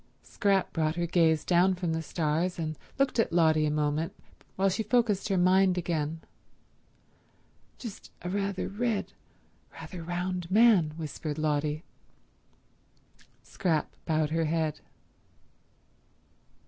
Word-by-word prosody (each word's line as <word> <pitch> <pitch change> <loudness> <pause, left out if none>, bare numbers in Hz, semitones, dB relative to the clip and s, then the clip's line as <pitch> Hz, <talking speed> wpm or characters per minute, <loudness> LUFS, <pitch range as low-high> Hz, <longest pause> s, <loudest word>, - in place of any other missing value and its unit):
Scrap 200 -3 0
brought 155 -1 0
her 175 0 -1
gaze 165 -2 +2
down 185 +1 +4
from 175 -2 -2
the 160 - -1
stars 160 +2 -1
and 155 -2 -3 0.2
looked 275 -3 +1
at 225 - +2
Lotty 160 -2 +3
a - - +1
moment 150 +2 -1 0.4
while 195 +1 +2
she 195 +3 0
focused 215 -2 +1
her 195 - +2
mind 185 +1 +4
again. 160 -2 -2 1.6
"Just 230 -5 -9
a 175 - -3
rather 200 -1 -1
red, 220 +1 -2 0.6
rather 180 -3 -8
round 175 +1 -3
man," 195 -7 +5
whispered 155 -1 -5
Lotty. 150 0 -1 1.6
Scrap 165 -5 -1
bowed 155 -2 +1
her 165 0 +1
head. 160 -1 -1
170 Hz, 120 wpm, -29 LUFS, 155-190 Hz, 1.6 s, man